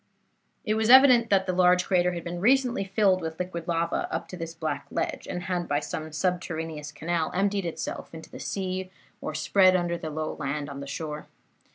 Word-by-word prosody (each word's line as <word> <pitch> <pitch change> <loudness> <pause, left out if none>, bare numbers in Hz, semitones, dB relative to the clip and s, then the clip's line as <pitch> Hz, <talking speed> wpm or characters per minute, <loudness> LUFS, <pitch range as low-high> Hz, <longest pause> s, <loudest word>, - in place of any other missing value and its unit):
"It 215 - +1
was 220 +1 +1
evident 250 -3 +8
that 195 -1 +3
the 185 - -1
large 180 0 +4
crater 180 -1 +2
had 170 -1 -5
been 175 0 -5
recently 250 +1 +3
filled 195 -1 +2
with 160 -1 -5
liquid 180 -2 -4
lava 170 0 -1
up - - -3
to - - -7
this 165 -1 -6
black 160 -1 -3
ledge, - - -3
and 180 - -4
had, 180 -1 -2
by 145 0 +1
some 155 +1 -5
subterraneous 160 -3 -3
canal, 160 +2 -1
emptied 195 -1 +1
itself 165 - -5
into 160 -1 -11
the - - -9
sea 185 -1 -3 0.3
or 155 - -4
spread 185 +4 +4
under 175 -1 0
the 160 -2 -5
low 155 0 -3
land 145 0 -3
on 140 - -7
the 140 - -7
shore. 150 +1 -5
175 Hz, 200 wpm, -27 LUFS, 160-190 Hz, 0.3 s, evident